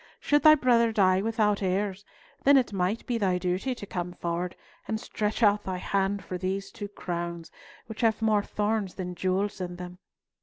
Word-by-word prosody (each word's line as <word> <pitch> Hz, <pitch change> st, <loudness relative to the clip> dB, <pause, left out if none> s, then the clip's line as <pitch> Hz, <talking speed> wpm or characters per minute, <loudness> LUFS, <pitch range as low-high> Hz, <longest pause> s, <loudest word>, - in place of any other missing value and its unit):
Should 290 Hz, 0 st, +2 dB
thy 310 Hz, -1 st, +8 dB
brother 235 Hz, -4 st, +3 dB
die 190 Hz, -3 st, +3 dB
without 215 Hz, -2 st, +1 dB
heirs, 195 Hz, +1 st, -1 dB, 0.4 s
then 280 Hz, 0 st, +7 dB
it 245 Hz, -5 st, +1 dB
might 190 Hz, +4 st, -1 dB
be 240 Hz, -2 st, -1 dB
thy 185 Hz, -3 st, +2 dB
duty 185 Hz, +8 st, -1 dB
to 205 Hz, -, -8 dB
come 180 Hz, -2 st, -4 dB
forward 175 Hz, +1 st, -3 dB, 0.3 s
and 220 Hz, 0 st, -1 dB
stretch 215 Hz, +1 st, -2 dB
out 205 Hz, 0 st, +4 dB
thy 185 Hz, -1 st, -3 dB
hand 195 Hz, +1 st, -1 dB
for 180 Hz, +1 st, -5 dB
these 190 Hz, +2 st, -3 dB
two 205 Hz, -, -6 dB
crowns, 170 Hz, -4 st, -5 dB, 0.3 s
which 220 Hz, +1 st, -7 dB
have 225 Hz, -2 st, +2 dB
more 215 Hz, -2 st, +3 dB
thorns 210 Hz, -2 st, -2 dB
than 180 Hz, -2 st, -4 dB
jewels 190 Hz, +3 st, -1 dB
in 180 Hz, -1 st, -4 dB
them. 180 Hz, 0 st, -9 dB
200 Hz, 185 wpm, -27 LUFS, 180-220 Hz, 0.4 s, thy